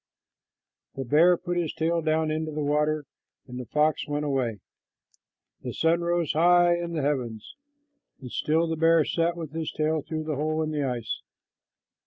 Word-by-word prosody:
The 135 - -4
bear 165 +7 +5
put 175 +1 -3
his 170 -3 -1
tail 165 +1 0
down 155 0 +1
into 155 0 -2
the 150 0 -3
water, 150 +1 +1 0.4
and 125 -1 -8
the 125 - -7
fox 150 +1 +1
went 145 0 -2
away. 130 -6 -1 1.0
The - - -6
sun 165 +1 +2
rose 170 -2 0
high 175 +2 +5
in 170 0 -4
the 155 -4 -1
heavens, 125 - -3 0.6
and 125 -3 -9
still 160 +2 +1
the 165 -1 -2
bear 165 -1 +4
sat 170 +1 0
with 160 -4 -6
his 160 -1 -3
tail 155 0 0
through 155 +1 -4
the 155 -2 -3
hole 155 +2 0
in 155 - -3
the 150 -2 -1
ice. 120 -3 -3
155 Hz, 175 wpm, -26 LUFS, 145-165 Hz, 1.0 s, bear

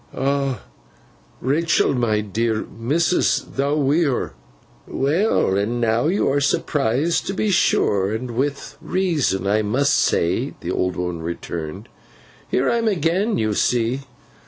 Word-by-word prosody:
'Ah, 135 0 -1 0.8
Rachael, 155 +6 +2
my 115 -4 +1
dear! 110 +2 -1
Missus, 155 +10 +1
thou 140 +2 -1
wi' 145 0 +2
her!' 135 -4 -1 0.5
'Well, 145 - +1
and 110 +5 0
now 115 +3 +1
you 190 +5 +1
are 145 +1 +1
surprised 140 +3 0
to 195 - -2
be 210 +1 0
sure, 100 - +2
and 120 +3 -4
with 140 +4 -3
reason 155 - 0
I 105 +2 +2
must 125 +7 +1
say,' 105 +11 +1
the 85 - -3
old 90 0 -1
woman 90 -2 -3
returned. 85 +3 -5 0.6
'Here 130 - +1
I 235 - +2
am 230 - 0
again, 190 +3 +1
you 110 -1 0
see. 120 +4 +1
125 Hz, 135 wpm, -21 LUFS, 105-150 Hz, 0.8 s, Rachael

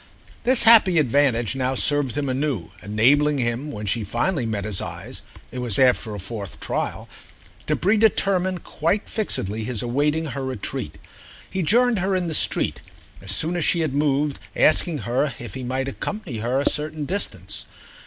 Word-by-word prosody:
This 255 0 +4
happy 215 -6 +7
advantage 130 -4 +2
now 130 0 -1
served 145 -2 +1
him 145 -1 -1
anew, 130 - -2
enabling 140 +8 +3
him 125 +4 -2
when 105 -1 -6
she 105 +3 0
finally 135 - -1
met 105 -3 -3
his 105 -4 -1
eyes—it 125 - -9
was 120 -5 +1
after 125 -4 +2
a - - -6
fourth 100 -1 -7
trial—to - - -5
predetermine 195 -3 +2
quite 170 +7 -1
fixedly 110 - -1
his 115 -1 -2
awaiting 145 +6 0
her 135 -2 -5
retreat. 130 -6 -4 0.5
He 190 - -3
joined 235 +5 +3
her 190 +1 0
in 180 -1 0
the 165 - -2
street - - +2 0.4
as 100 - -4
soon 160 - +1
as 175 - 0
she 170 - +3
had 155 -4 -1
moved, 145 0 0 0.2
asking 155 -1 +3
her 130 +4 0
if 120 - -8
he 130 - -6
might 130 +2 -2
accompany 140 - -5
her 120 +4 0
a 140 - 0
certain 150 0 -1
distance. 100 - -4
140 Hz, 165 wpm, -23 LUFS, 115-165 Hz, 0.5 s, happy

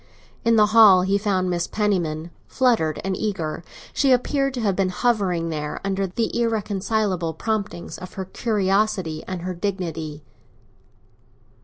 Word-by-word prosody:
In 230 0 +4
the 215 -1 +6
hall 205 -5 +8
he 195 +2 +1
found 195 -3 0
Mrs. 175 -1 -1
Penniman, 175 -6 -1 0.2
fluttered 230 - +1
and 195 0 -1
eager; 170 -7 -3 0.3
she 275 -2 +2
appeared 275 +2 +2
to 245 - -3
have 200 -4 +1
been 190 -1 +1
hovering 185 -5 0
there 150 -2 -4
under 195 0 0
the 225 +5 -2
irreconcilable 205 -5 -1
promptings 205 -3 -3
of 185 -1 -9
her 190 - -4
curiosity 195 -5 0
and 185 -2 -5
her 185 0 -3
dignity. 165 -5 -4
195 Hz, 140 wpm, -23 LUFS, 175-215 Hz, 0.3 s, hall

